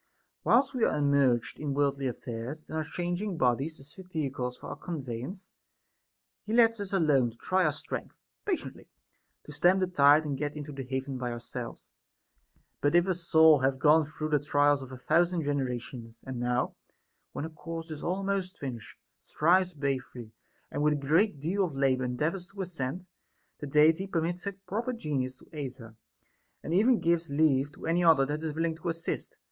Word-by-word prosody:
Whilst 270 +4 +4
we 250 -3 -1
are - - +2
immersed 140 -5 +2
in 145 -2 -2
worldly 140 -1 +1
affairs, 125 +5 -6
and - - -6
are 160 - 0
changing 175 +4 -3
bodies, 135 +5 +1
as 140 +2 -11
fit 185 -1 -13
vehicles 130 -6 -3
for - - -9
our - - -5
conveyance, 150 - -6 0.9
he 215 - -4
lets 230 -1 +5
us 200 -2 -4
alone 150 -10 +3
to 115 - -15
try 185 +5 +1
our 155 - +3
strength, 145 - -6 0.3
patiently 385 -4 -4 0.5
to - - -11
stem 180 +2 +4
the 190 - +2
tide 150 -3 +5
and 140 -3 -3
get 145 0 -2
into 150 0 -6
the 135 -1 -6
haven 130 0 -3
by 125 -1 -2
ourselves; 120 0 -7 0.9
but 145 +3 +2
if 175 0 +5
a 190 - +1
soul 160 -3 +5
hath 130 0 +1
gone 155 +3 +5
through 155 +1 -5
the 150 -1 +3
trials 145 -1 +3
of 130 -1 -9
a 130 - -7
thousand 170 +5 +2
generations, 125 -4 -3
and 130 -2 -5
now, 125 +1 0 0.6
when - - -5
her 160 - -4
course 165 +1 -7
is 150 - -6
almost 195 +1 -2
finished, 125 -6 -7 0.2
strives 180 +2 +2
bravely, 130 -5 -3 0.4
and - - -2
with 150 0 +3
a 140 -2 -4
great 165 +1 +3
deal 180 +7 0
of 170 -5 -2
labor 130 -2 +2
endeavors 160 +9 -2
to 200 0 -15
ascend, 175 -1 -4 0.5
the 145 - -5
Deity 155 +6 +4
permits 175 +1 -2
her 200 - -2
proper 225 +7 -2
Genius 140 - -2
to - - -19
aid 140 -4 -5
her, 115 -4 -13 0.7
and 160 - -3
even 220 +6 +4
gives 170 -1 +1
leave 140 -1 +2
to - - -10
any 170 +2 +2
other, 160 -5 +6
that 150 +2 -3
is 155 -2 -3
willing 165 0 0
to 165 +1 -4
assist. 165 0 -4
150 Hz, 185 wpm, -29 LUFS, 135-175 Hz, 0.9 s, other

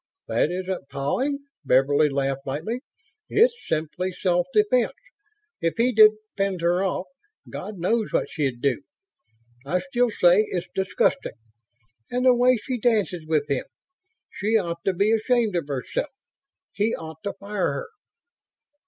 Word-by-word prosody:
"That - - +1
isn't 185 -4 -4
pawing," 265 - -1 0.2
Beverly 140 +3 +4
laughed 135 0 -2
lightly. 170 - -3 0.5
"It's 470 +4 +5
simply 160 +4 -2
self 180 -1 0
defense. 225 +6 +2 0.7
If 165 0 0
he 240 +2 +3
didn't 215 -2 +7 0.2
fend 195 -3 -1
her 175 +2 +2
off, 190 -1 -1 0.5
God 210 -1 -6
knows 215 +6 0
what - - +1
she'd 135 -6 -2
do. 140 -3 +1 0.8
I 150 +6 0
still 245 +2 0
say 190 +1 +4
it's 175 -1 -2
disgusting. 190 -9 0 0.7
And 250 +1 -1
the 255 - +7
way 250 +1 +4
she 255 -2 -3
dances 205 -8 +1
with 155 -2 +1
him! 140 -3 -1 0.7
She 220 +2 +1
ought 170 -4 -3
to 195 - +2
be 200 +4 +2
ashamed 225 -2 +2
of 170 -4 -1
herself. 140 - -3 0.6
He 215 +3 +1
ought 160 0 -9
to 200 - -3
fire 200 -1 -2
her." 485 - -5
185 Hz, 145 wpm, -24 LUFS, 160-225 Hz, 0.8 s, didn't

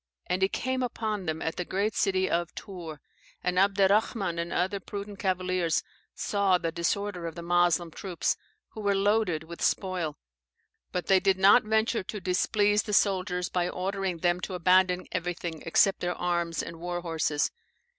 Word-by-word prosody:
And 180 +1 -1
he 190 - +4
came 260 +3 -2
upon 215 -6 -2
them 160 0 -2
at 160 - -3
the 180 - -1
great 200 +4 -1
city 190 -1 +1
of 170 -1 -1
Tours. 170 -6 -7 0.5
And 180 0 +1
Abderrahman 195 -1 +2
and 170 0 -3
other 190 +3 0
prudent 200 +1 -7
cavaliers 185 -3 0 0.3
saw 200 -3 +2
the 165 -2 -2
disorder 180 +1 -2
of 165 - -7
the 170 - -7
Moslem 175 -1 +2
troops, 180 0 -1 0.3
who 215 - -8
were 200 -1 +2
loaded 195 -5 +1
with 170 +1 -10
spoil; 180 -6 0 0.7
but 180 -2 -2
they 190 +1 +5
did 195 -1 +2
not 200 +5 +6
venture 220 +2 +1
to 210 +3 -6
displease 205 +3 +2
the 210 - -5
soldiers 185 -3 +2
by 180 -1 0
ordering 190 -1 -2
them 175 +1 +1
to 185 +1 -4
abandon 180 +1 +3
everything 175 -2 -3
except 195 +4 +4
their 175 0 -2
arms 170 -1 -1
and 165 - -8
war 175 0 -3
horses. 160 -3 0
185 Hz, 165 wpm, -28 LUFS, 175-200 Hz, 0.7 s, not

